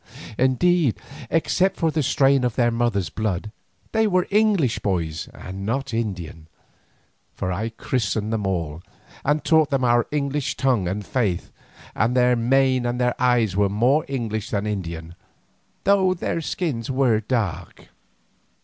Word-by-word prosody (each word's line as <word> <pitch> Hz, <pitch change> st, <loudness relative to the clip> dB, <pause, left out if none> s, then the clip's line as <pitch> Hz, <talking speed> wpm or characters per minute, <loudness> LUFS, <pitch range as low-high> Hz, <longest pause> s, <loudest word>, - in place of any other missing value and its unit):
Indeed, 135 Hz, +2 st, +2 dB, 0.3 s
except 185 Hz, +3 st, +1 dB
for 165 Hz, -1 st, +1 dB
the 155 Hz, -, 0 dB
strain 135 Hz, 0 st, +3 dB
of 125 Hz, -3 st, 0 dB
their 120 Hz, -1 st, +2 dB
mother's 115 Hz, -8 st, 0 dB
blood, 105 Hz, 0 st, -2 dB, 0.4 s
they 220 Hz, 0 st, +2 dB
were 185 Hz, -3 st, +2 dB
English 205 Hz, -, +2 dB
boys 85 Hz, -5 st, -2 dB
and 95 Hz, +1 st, -8 dB
not 120 Hz, +4 st, -2 dB
Indian, 90 Hz, -8 st, -4 dB, 0.9 s
for 90 Hz, -, -2 dB
I 105 Hz, +6 st, -2 dB
christened 110 Hz, -2 st, -2 dB
them 105 Hz, -3 st, -1 dB
all, 85 Hz, -4 st, -3 dB, 0.4 s
and 150 Hz, +1 st, +1 dB
taught 160 Hz, -2 st, +4 dB
them 135 Hz, -2 st, 0 dB
our 120 Hz, -1 st, +3 dB
English 145 Hz, -1 st, -2 dB
tongue 125 Hz, -9 st, +1 dB
and 100 Hz, +3 st, -3 dB
faith, 105 Hz, -9 st, -1 dB, 0.4 s
and 115 Hz, +4 st, +1 dB
their 125 Hz, 0 st, +4 dB
mien 130 Hz, +2 st, +2 dB
and 120 Hz, +1 st, -2 dB, 0.2 s
eyes 120 Hz, -6 st, +2 dB
were 100 Hz, 0 st, +2 dB
more 125 Hz, +9 st, +2 dB
English 115 Hz, -6 st, -3 dB
than 100 Hz, -1 st, -1 dB
Indian, 85 Hz, -5 st, -4 dB, 0.7 s
though 190 Hz, -2 st, +3 dB
their 170 Hz, -1 st, -2 dB
skins 150 Hz, -8 st, -3 dB
were 130 Hz, -4 st, +2 dB
dark. 110 Hz, -, -3 dB
120 Hz, 140 wpm, -23 LUFS, 100-140 Hz, 0.9 s, taught